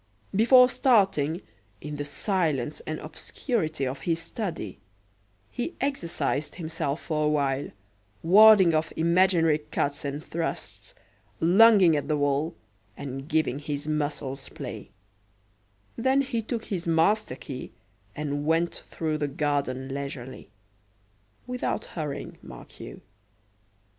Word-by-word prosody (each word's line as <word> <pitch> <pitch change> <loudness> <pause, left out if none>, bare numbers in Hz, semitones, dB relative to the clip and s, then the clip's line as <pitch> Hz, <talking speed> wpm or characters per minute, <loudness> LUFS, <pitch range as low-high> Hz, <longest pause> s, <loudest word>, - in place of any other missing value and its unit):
Before 250 +4 +7
starting, 195 - +2 0.4
in 150 +1 -7
the 145 - -3
silence 155 - 0
and 155 - -2
obscurity 155 - -3
of 130 +1 -4
his 165 +3 0
study, 165 - -5 0.7
he 245 +8 -4
exercised 175 - -2
himself 160 -3 -3
for 155 -2 -1
a - - +3
while, 140 -2 0 0.5
warding 195 -1 +7
off 155 0 0
imaginary 170 -2 +3
cuts 150 -1 -2
and 145 +2 -4
thrusts, 170 - -5 0.4
lunging 190 0 +6
at 145 - -2
the 150 - +1
wall, 145 +3 0 0.4
and 135 +1 -6
giving 155 -4 +1
his 145 0 -4
muscles 145 -3 -3
play; - - -8 1.1
then 265 +3 +2
he 260 -4 -2
took 225 +1 -4
his 180 -4 -4
master 165 0 +2
key 130 -1 -8 0.4
and 145 -1 -3
went 165 +1 +2
through 155 -2 -4
the 145 - 0
garden 140 -2 -2
leisurely; 140 -5 -6 1.0
without 250 0 -2
hurrying, 150 -4 -6
mark - - -12
you. - - -9
155 Hz, 120 wpm, -27 LUFS, 145-190 Hz, 1.1 s, Before